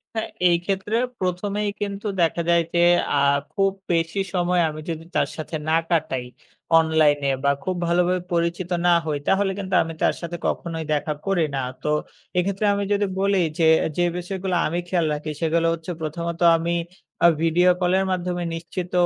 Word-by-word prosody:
হ্যাঁ, 220 - -2 0.2
এই 170 - +4
ক্ষেত্রে 195 +3 -1 0.2
১ম 185 +2 -2
এই 205 - 0
কিন্তু 200 +1 -3
দেখা 170 +1 +2
যায় 170 0 +4
যে 175 0 +4 0.3
আ - - +4 0.3
খুব 195 0 +2 0.2
বেশি 165 +3 0
সময় 180 0 +2
আমি 155 0 -7
যদি 165 0 -4
তার - - +2
সাথে 155 +1 -5
না 160 - +4
কাটাই 135 -7 0 0.5
অনলাইনে 155 -3 +3
বা 140 - +4
খুব 185 - -2
ভালোভাবে 180 +1 +2
পরিচিত 170 +1 -1 0.2
না 175 - +5 0.2
হই 150 -2 -1
তাহলে 195 0 +2
কিন্তু 190 -1 -2
আমি 165 0 -6
তার - - +3
সাথে 170 0 -5
কখনোই 165 -2 -3
দেখা 150 +1 -1
করি 190 -4 +2
না। - - -1 0.2
তো 150 - -1 0.5
এক্ষেত্রে 195 +3 0
আমি 200 0 -1
যদি 205 0 +1
বলি 200 0 +2 0.2
যে, - - +3 0.3
যে 175 - +3
বিষয়গুলো 185 +1 -3
আমি 170 +3 -2
খেয়াল 175 -3 +1
রাখি 150 +1 -4
সেগুলো 165 0 +2
হচ্ছে 165 +1 -6
প্রথমত 170 +2 -4 0.2
আমি 170 +1 -1 0.5
অ্যা 170 - +7
ভিডিও 175 +2 +4
কলের 190 +2 +2
মাধ্যমে 180 -1 -2
নিশ্চিত 175 +2 -6
175 Hz, 175 wpm, -23 LUFS, 165-190 Hz, 0.5 s, অ্যা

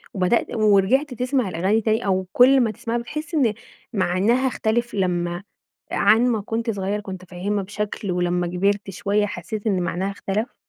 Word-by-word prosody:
وبدأت 190 +5 +1
ورجعت 215 +6 +3
تسمع 250 -3 0
الأغاني 190 +6 +1
تاني 220 0 0
أو 190 -1 0
كل 265 +2 +6
ما 230 -3 +1
تسمعها 235 +1 -3
بتحس 300 +7 -6
إن 250 -8 +3 0.4
معناها 205 +7 +2
اختلف 240 -1 -1
لمّا 175 -2 -1 0.5
عن 230 +3 +4
ما 225 -3 0
كنت 225 +3 -3
صغير 200 0 -2
كنت 190 -2 -8
فاهمها 195 +3 -2
بشكل 210 0 -4
ولما 175 0 0
كبرت 195 +3 0
شوية 205 +1 0
حسيت 205 +2 -5
إن 190 -4 +1
معناها 185 +3 -2
اختلف؟ 200 +3 -3
205 Hz, 155 wpm, -22 LUFS, 185-235 Hz, 0.5 s, كل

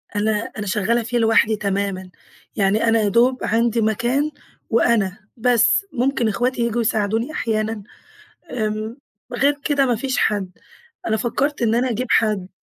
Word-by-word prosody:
أنا 210 +1 +1 0.3
أنا 210 -1 -4
شغّالة 220 +4 +1
فيه 235 +2 -2
لوحدي 225 -1 +3
تمامًا، 200 -2 -2 0.5
يعني 205 +2 +2
أنا 225 0 +4
يا 210 - +1
دوب 245 +4 +2
عندي 230 +1 +1
مكان 240 +7 0 0.4
وأنا، 220 -4 +2 0.2
بس، 245 - +3
ممكن 250 -1 0
اخواتي 245 +4 -1
ييجوا 235 0 0
يساعدوني 220 +3 0
أحيانًا. 220 -5 -2 0.7
آمم. 215 0 -3 0.4
غير 285 +4 +1
كده 285 -2 +2
ما 245 -2 +1
فيش 260 +3 -2
حد. 200 -3 0 0.6
أنا 220 - +1
فكّرت 270 +5 -1
إن 225 -1 +2
أنا 250 +2 +1
أجيب 245 +3 -2
حد. 210 -4 +2
225 Hz, 145 wpm, -21 LUFS, 215-245 Hz, 0.7 s, أنا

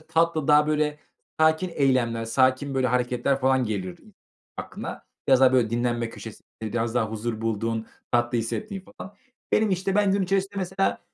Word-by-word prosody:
tatlı, 160 -1 0
daha 150 0 +6
böyle 150 -1 0 0.4
sakin 160 +3 +3
eylemler, 125 -5 +1
sakin 130 +4 +1
böyle 130 -1 +2
hareketler 125 +2 0
falan 130 0 +3
gelir 95 -5 -4
i - - -20 0.4
aklına. - - -7 0.2
Biraz 130 -1 +5
daha 130 -1 +6
böyle 120 -4 +3
dinlenme 120 0 -1
köşesinde 110 -1 -10 0.3
biraz 115 0 -1
daha 110 -3 +1
huzur 110 0 -4
bulduğun, 115 0 -2 0.3
tatlı 120 0 +2
hissettiğin 195 - -4
falan. 195 - -9 0.4
Benim, 215 -1 +3
işte, 190 +1 0
ben 205 -1 +3
gün 200 0 +1
içerisinde, 195 +1 0
mesela, 190 0 0
130 Hz, 160 wpm, -25 LUFS, 115-165 Hz, 0.4 s, daha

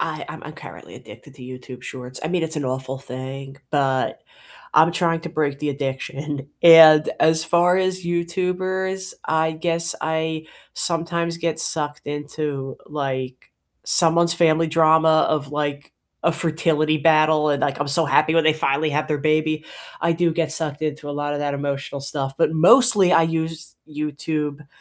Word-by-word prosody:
I - - -4
I'm - - -9
currently - - -12
addicted - - -14
to - - -14
YouTube 125 0 -10
Shorts, 130 -1 -8
I - - -2
mean, 175 0 -1
it's 160 0 -2
an 145 - -3
awful 130 +1 -4
thing, 135 +1 -8
but 135 -3 -1 0.5
I'm 160 +2 +5
trying 165 -1 0
to 170 - -7
break 150 -4 -2
the 150 - -2
addiction, 140 +1 -5
and 160 -2 +8
as 160 0 +3
far 175 +2 +3
as 185 0 -1
YouTubers, 185 +2 -2
I 160 0 0
guess 165 +1 -1
I 160 0 -3 0.3
sometimes 170 0 -1
get 165 -1 -2
sucked 150 -2 -2
into, 145 -2 -5
like, 130 -3 -5 0.3
someone's 170 0 +4
family 165 -1 +2
drama 160 0 +3
of, 145 -2 -2
like, 145 -1 -4 0.3
a 170 - +3
fertility 155 -1 +1
battle, 155 0 +3
and 145 - -1
like, 140 - -1
I'm 145 - -2
so 155 +4 +2
happy 155 +2 +2
when 165 - +4
they 155 -1 +3
finally 155 0 0
have 150 +1 -1
their 150 -2 -1
baby, 155 +1 0 0.4
I 170 - +1
do 170 0 0
get 160 -1 -1
sucked 155 -2 -4
into 150 -1 -4
a - - -4
lot 145 0 -3
of - - -3
that 145 -1 -2
emotional 140 0 -4
stuff, 135 -1 -4
but - - +2
mostly 195 +2 +6
I 165 - +5
use 160 0 -3
YouTube 150 -1 -4
155 Hz, 165 wpm, -21 LUFS, 145-165 Hz, 0.5 s, and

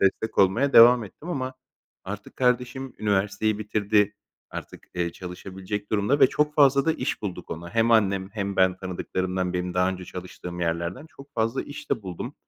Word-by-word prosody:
destek 110 +3 +1
olmaya 95 +9 +4
devam 120 0 +8
ettim 150 - -12
ama 130 -5 -3 0.5
artık 100 +1 -7
kardeşim 125 +1 0
üniversiteyi 105 +1 +1
bitirdi. 105 -1 +1 0.4
Artık, - - -9
eee, 85 -1 -1
çalışabilecek 95 +3 -6
durumda 110 +7 +1
ve - - +9
çok 150 +3 0
fazla 140 -2 +5
da 160 - +3
iş - - -3
bulduk 90 -4 -5
ona. 85 +2 -6
Hem 115 +1 +3
annem 100 -4 +3
hem 100 -2 -3
ben 95 -1 +4
tanıdıklarımdan, 95 0 -2
birinin 90 0 -2
daha 90 +1 +3
önce 95 -1 -4
çalıştığım 90 -1 -8
yerlerden 85 - -2
çok 140 -1 -16
fazla 115 +3 0
iş 145 - -10
de 110 - 0
buldum 90 -3 -6
105 Hz, 170 wpm, -25 LUFS, 95-125 Hz, 0.5 s, ve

